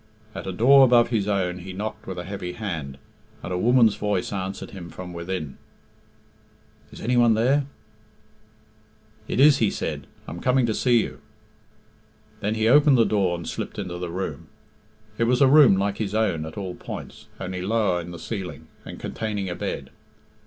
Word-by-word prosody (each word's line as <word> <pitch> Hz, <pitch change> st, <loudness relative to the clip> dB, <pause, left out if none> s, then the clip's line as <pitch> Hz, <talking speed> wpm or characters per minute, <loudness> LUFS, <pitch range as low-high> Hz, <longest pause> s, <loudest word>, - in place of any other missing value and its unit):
At -, -, -7 dB
a -, -, -2 dB
door 135 Hz, +8 st, +6 dB
above 120 Hz, -2 st, +5 dB
his 110 Hz, -4 st, 0 dB
own 90 Hz, -3 st, -1 dB
he 95 Hz, +1 st, -8 dB
knocked 105 Hz, +3 st, -6 dB
with 95 Hz, -1 st, -5 dB
a 90 Hz, -, -4 dB
heavy 90 Hz, -1 st, -6 dB
hand, 80 Hz, -11 st, -5 dB, 0.5 s
and 90 Hz, -, -4 dB
a -, -, 0 dB
woman's 120 Hz, 0 st, +5 dB
voice 105 Hz, -2 st, -1 dB
answered 95 Hz, 0 st, -5 dB
him 90 Hz, -4 st, -9 dB
from 90 Hz, +1 st, -8 dB
within 85 Hz, -4 st, -5 dB, 1.3 s
"Is -, -, -11 dB
any 125 Hz, +3 st, 0 dB
one 120 Hz, -2 st, +5 dB
there?" 135 Hz, +5 st, +2 dB, 1.6 s
"It -, -, -2 dB
is!," 145 Hz, 0 st, +6 dB
he 110 Hz, -, +3 dB
said. -, -, -4 dB, 0.2 s
"I -, -, -6 dB
am 85 Hz, -, -7 dB
coming 125 Hz, +2 st, +2 dB
to 110 Hz, -, 0 dB
see 120 Hz, 0 st, +3 dB
you." -, -, -8 dB, 1.2 s
Then 105 Hz, +2 st, -1 dB
he 110 Hz, 0 st, +1 dB
opened 145 Hz, +2 st, +6 dB
the 115 Hz, -, +5 dB
door 95 Hz, -4 st, +1 dB
and 85 Hz, -, -8 dB
slipped -, -, -5 dB
into 90 Hz, -3 st, -5 dB
the 90 Hz, -1 st, -4 dB
room. 85 Hz, -2 st, -5 dB, 0.7 s
It 115 Hz, -, +3 dB
was 125 Hz, +1 st, +2 dB
a 140 Hz, -, +6 dB
room 140 Hz, -7 st, +7 dB
like 100 Hz, +1 st, -1 dB
his 105 Hz, -1 st, -2 dB
own 85 Hz, -8 st, 0 dB
at 80 Hz, -, -10 dB
all 95 Hz, -3 st, -4 dB
points, -, -, -9 dB
only 90 Hz, -1 st, -4 dB
lower 100 Hz, -3 st, +1 dB
in 85 Hz, -, -9 dB
the 85 Hz, -, -8 dB
ceiling, 95 Hz, +1 st, -6 dB, 0.2 s
and -, -, -9 dB
containing 105 Hz, -4 st, -3 dB
a 85 Hz, -, -4 dB
bed. -, -, -5 dB
100 Hz, 185 wpm, -24 LUFS, 90-115 Hz, 1.6 s, room